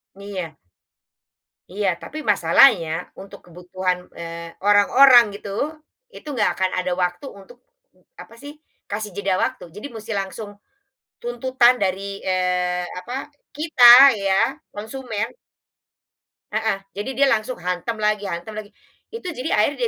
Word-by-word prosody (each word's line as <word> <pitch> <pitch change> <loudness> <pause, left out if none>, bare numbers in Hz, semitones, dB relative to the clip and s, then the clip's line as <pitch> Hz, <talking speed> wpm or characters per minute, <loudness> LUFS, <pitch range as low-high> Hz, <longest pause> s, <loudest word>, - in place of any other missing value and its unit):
Iya. 190 -6 -7 1.1
Iya 200 +1 -2
tapi 310 - -9
masalahnya 175 0 +4 0.3
untuk 195 - -12
kebutuhan, 180 +1 -3 0.2
eee, 170 0 -7 0.2
orang-orang 240 +5 +7
gitu, 200 - -9 0.7
itu - - -13
enggak 215 -5 +1
akan 185 0 0
ada 180 0 -2
waktu 180 +8 -3
untuk 240 +6 -16 0.6
apa 230 - -14
sih? 290 +1 -9 0.4
Kasih 210 0 -4
jeda 195 -2 -1
waktu 260 0 -3
jadi 210 +7 -7
musti 220 0 -8
langsung 205 +2 -6 0.7
tuntutan 245 +1 +2
dari, 190 0 0 0.2
eee, 180 -1 0
apa, 185 +8 -8 0.4
kita 305 -4 +1 0.3
ya 195 -1 0 0.4
konsumen. 220 0 -5 1.2
Heeh, 215 -2 -1
jadi 205 +6 -6
dia 280 +2 +3
langsung 225 +3 -1
hantam 180 +5 -3
lagi 210 -1 -1
hantam 170 +4 -6
lagi, 205 0 -12 0.3
itu 460 -2 -9
jadi 315 -5 -3
akhirnya 245 +3 +1
205 Hz, 125 wpm, -21 LUFS, 185-240 Hz, 1.2 s, orang-orang